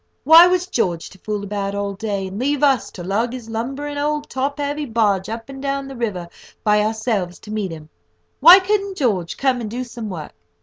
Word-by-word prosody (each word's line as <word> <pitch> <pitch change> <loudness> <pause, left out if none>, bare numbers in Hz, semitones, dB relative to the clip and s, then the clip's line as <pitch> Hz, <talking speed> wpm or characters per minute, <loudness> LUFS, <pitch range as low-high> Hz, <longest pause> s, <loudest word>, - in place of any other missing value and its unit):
Why 325 +5 +9
was 360 0 +1
George 180 - -2
to 190 - -16
fool 210 0 -4
about 200 0 -3
all 200 0 -2
day, 200 -1 -3
and 190 +2 -6
leave 285 +3 0
us 270 -5 +3
to 175 - -8
lug 205 +6 0
this 245 -3 -7
lumbering 270 +6 -4
old 300 0 -1
top 275 +2 -2
heavy 290 +1 -2
barge 210 -5 +1
up 225 +1 -6
and 270 -1 -9
down 275 0 -2
the 270 - -8
river 205 -8 -3 0.4
by 210 0 +3
ourselves 215 -4 -1
to 210 - -11
meet 210 -3 -2
him? 155 -2 -9 0.5
Why 340 +6 +10
couldn't 395 0 -1
George 200 - -1
come 260 -3 +1
and 220 - -4
do 245 +4 -4
some 235 -3 -7
work? 165 -5 -7
230 Hz, 210 wpm, -20 LUFS, 200-280 Hz, 0.5 s, Why